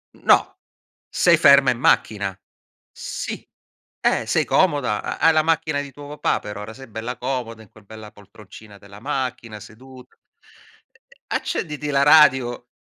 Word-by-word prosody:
No, - - +2 0.5
sei - - +3
ferma 140 -1 +6
in 125 - -4
macchina. 100 -5 +1 0.6
Sì, - - -7 0.5
eh, - - +1
sei - - +1
comoda, 145 - +1
ha - - -5
hai 165 - +4
la 155 0 +3
macchina 155 -2 0
di 140 -1 -9
tuo 145 +2 -12
papà 150 0 -1
però, 105 0 -8
ora 105 +2 -8
sei 130 +2 -13
bella 115 +3 -6
comoda 120 -3 -5
in 100 - -21
quel 110 -1 -20
bella 110 0 -12
poltroncina 105 0 -16
della 100 0 -15
macchina 125 -5 -4
sedu 130 +5 -14
e - - -32 0.9
e - - -24
accenditi 150 -2 -4
la 140 -1 +2
radio 130 -5 +4
125 Hz, 155 wpm, -21 LUFS, 110-145 Hz, 0.9 s, ferma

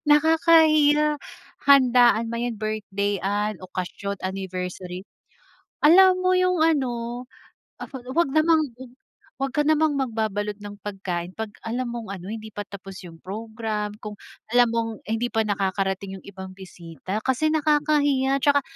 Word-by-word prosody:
Nakakahiya, 305 -1 +5 0.5
handaan 245 -4 +6
man 235 0 -2
'yan, 230 - -5
birthday-han, 205 -1 -2
okasyon, 185 +2 -5
anniversary, 185 -1 -5 0.8
alam 370 +4 +7
mo 370 - +3
'yung 365 0 +2
ano, 245 -5 -1 0.5
af - - -7
ah, - - -7
'wag 335 -4 +2
namang, 315 +1 +4 0.7
'wag 270 0 -3
ka 295 - +2
namang 310 -2 +2
magbabalot 215 -5 -2
ng 205 0 -9
pagkain 185 -3 -5
'pag 220 -1 -5 0.2
alam 240 +2 -2
mong 235 -2 -6
ano, 185 +2 -8
hindi 220 -1 -7
pa 205 - -3
tapos 195 -1 -10
'yung 165 -2 -12
program, 215 +1 -4
kung 210 -1 -7 0.4
alam 245 -1 +5
mong 230 0 -1 0.2
hindi 225 +2 0
pa 225 -2 +1
nakakarating 195 -1 -2
'yung - - -19
ibang 190 -1 -9
bisita, 180 -1 -7
kasi 260 +6 +1
nakakahiya, 295 -3 +2
tsaka 285 +1 +3
225 Hz, 135 wpm, -24 LUFS, 195-285 Hz, 0.8 s, alam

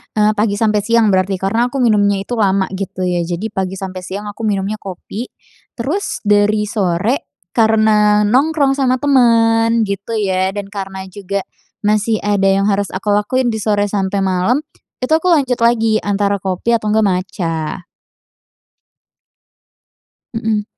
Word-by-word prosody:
eee, 215 0 +3
pagi 210 -1 0
sampai 210 0 +1
siang 225 0 +2
berarti 190 +1 +1
karena 200 +6 0
aku 265 0 -2
minumnya 205 -3 +2
itu 240 0 -4
lama 195 -2 +1
gitu 190 -1 -4
ya. 180 -1 0
Jadi, 180 +5 -4
pagi 190 -2 -3
sampai 190 -1 -6
siang 190 +3 -6
aku 220 +2 -4
minumnya 205 +1 -1
kopi, 200 +5 -7 0.5
terus 295 - -3
dari 210 +1 +3
sore 205 +3 -1 0.2
karena 215 -2 +3
nongkrong 275 +5 +2
sama 255 -1 +2
teman 230 -4 +3
gitu 200 +3 -4
ya 190 -2 0
dan 205 -1 -4
karena 190 -1 -6
juga 195 +1 -4 0.4
masih 215 +1 +2
ada 205 -1 +1
yang 195 +1 +2
harus 200 -1 0
aku 200 +2 -1
lakuin 240 +4 +1
di 220 - -3
sore 205 -1 +1
sampai 195 -1 -1
malam, 190 +10 +1 0.4
itu 255 - -2
aku 320 +3 +3
lanjut 270 -8 +2
lagi 225 -2 +2
antara 200 0 0
kopi 190 +4 -2
atau 225 -2 +1
enggak 215 0 +3
matcha. 180 -3 -2 2.6
Heeh. 215 -2 0
210 Hz, 145 wpm, -17 LUFS, 195-225 Hz, 2.6 s, eee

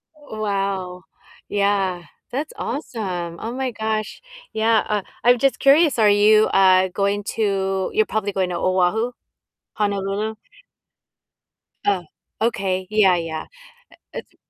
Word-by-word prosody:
Wow, 195 -8 -3 0.5
yeah, 195 -3 0 0.3
that's 285 +5 -4
awesome, 185 - -4
oh 225 - -5
my 260 -1 -2
gosh, 220 - -3 0.3
yeah, 220 0 +2
uh, 210 -1 +1 0.2
I'm 245 +1 +5
just 275 +1 +1
curious, 290 +2 +5
are 210 -1 +5
you, 215 +1 +5
uh, 190 -1 +4
going 200 +2 -1
to 195 -3 0
You're 435 +1 +3
probably 205 -2 -2
going 185 -2 0
to 175 - -3
Oahu, 185 +7 +1 0.6
Honolulu? 205 +1 -2 1.5
Oh, 195 -3 +1 0.4
okay, 190 -5 -1
yeah, 205 -4 +4
yeah, 165 -1 -4 0.7
it - - -6
it's - - -30
205 Hz, 120 wpm, -21 LUFS, 190-220 Hz, 1.5 s, I'm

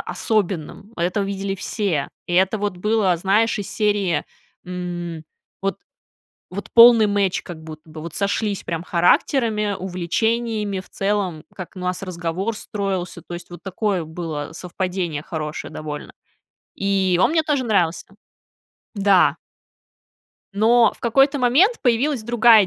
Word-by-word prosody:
особенным, 200 -1 -2
это 180 +4 0
видели 195 0 -2
все, 190 -6 -2 0.2
и 175 - -2
это 190 +4 +3
вот 205 -2 -2
было, 205 -1 +2
знаешь, 205 +6 +2
из 205 - -5
серии, 205 -6 +1 0.4
м, 175 -2 -5 0.4
вот 195 0 -1 0.7
вот 200 +2 -6
полный 230 -2 +9
match 200 -2 +1
как 165 -3 -9
будто 155 0 -11
бы, 155 0 -9
вот 165 0 -7
сошлись 200 0 -1
прям 165 -1 -3
характерами, 210 +4 +2
увлечениями, 205 +3 -1
в 185 - -12
целом, 195 -6 -1
как 185 -1 -8
у - - -8
нас 180 0 -2
разговор 185 +4 -3
строился, 195 -5 -3
то - - -10
есть 175 0 -8
вот 175 -1 -11
такое 195 -1 -1
было 160 -2 -5
совпадение 180 -3 -3
хорошее 155 -3 -5
довольно. 150 -1 -6 0.6
И 190 -3 +1
он 240 - +4
мне 320 -1 +2
тоже 290 -4 0
нравился, 180 -8 +1 0.9
да. 200 -3 +4 1.2
Но 225 +2 +4
в - - -23
какой-то 270 +5 +3
момент 295 - +4
появилась 250 +1 +2
другая 230 -2 +6
195 Hz, 135 wpm, -22 LUFS, 175-220 Hz, 1.2 s, полный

